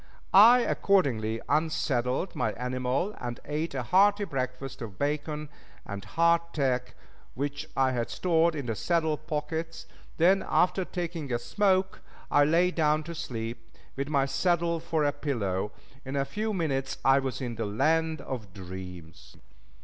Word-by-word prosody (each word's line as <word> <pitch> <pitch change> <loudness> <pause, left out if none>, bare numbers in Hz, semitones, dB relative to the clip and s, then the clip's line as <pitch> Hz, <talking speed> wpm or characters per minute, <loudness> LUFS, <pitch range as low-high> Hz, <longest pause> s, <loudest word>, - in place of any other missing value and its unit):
I 230 +6 +9
accordingly 120 - +1
unsaddled 150 -1 0
my 110 -4 0
animal 125 - -1
and 120 -1 -5
ate 150 +1 -3
a 130 - -1
hearty 200 +6 +4
breakfast 135 -4 -4
of 105 -5 -7
bacon 150 +1 -2 0.4
and 100 -1 -6
hardtack 150 -2 +1 0.4
which 145 +3 -3
I 135 -1 +3
had 120 -2 -2
stored 170 -2 +2
in 145 -3 -4
the 115 - -1
saddle 160 - +1
pockets; 160 +2 -4 0.3
then, 185 +4 +4
after 185 +1 +2
taking 170 -6 -4
a 120 - +2
smoke, 190 - +1 0.3
I 145 - +5
lay 170 +4 +3
down 155 -2 +2
to 170 +2 -7
sleep, 115 -6 -5 0.3
with 140 +1 -3
my 140 -3 +2
saddle 170 +4 +1
for 160 -1 -1
a 145 - +3
pillow. 105 -10 -2 0.3
In 135 +1 -5
a 140 0 +1
few 215 +8 -2
minutes 140 -8 -1
I 135 +1 +6
was 135 -1 -3
in 125 -3 -3
the 115 -1 -3
land 160 +9 +1
of 110 -8 -7
dreams. 90 -3 -9
145 Hz, 150 wpm, -28 LUFS, 125-170 Hz, 0.4 s, I